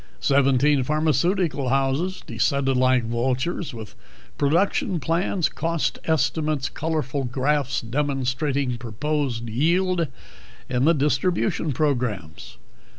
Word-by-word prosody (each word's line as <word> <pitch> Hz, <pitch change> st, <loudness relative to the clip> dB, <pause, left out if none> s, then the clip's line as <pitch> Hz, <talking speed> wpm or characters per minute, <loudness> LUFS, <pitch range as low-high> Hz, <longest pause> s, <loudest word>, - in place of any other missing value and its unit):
Seventeen 140 Hz, +1 st, +3 dB
pharmaceutical 155 Hz, +1 st, +1 dB
houses 135 Hz, +8 st, 0 dB
descended 135 Hz, +4 st, 0 dB
like 130 Hz, -1 st, +3 dB
vultures 130 Hz, +9 st, -1 dB
with 110 Hz, -3 st, -9 dB, 0.4 s
production 170 Hz, +4 st, +1 dB
plans, 165 Hz, +4 st, 0 dB
cost 165 Hz, -1 st, -2 dB
estimates, 155 Hz, -3 st, 0 dB
colorful 150 Hz, -4 st, -2 dB
graphs 135 Hz, +2 st, 0 dB
demonstrating 135 Hz, 0 st, -1 dB
proposed 120 Hz, +1 st, -2 dB
yield 170 Hz, +8 st, +1 dB, 0.6 s
and 135 Hz, +6 st, +2 dB
distribution 160 Hz, +4 st, 0 dB
programs. 120 Hz, -, -2 dB
140 Hz, 90 wpm, -24 LUFS, 125-160 Hz, 0.6 s, Seventeen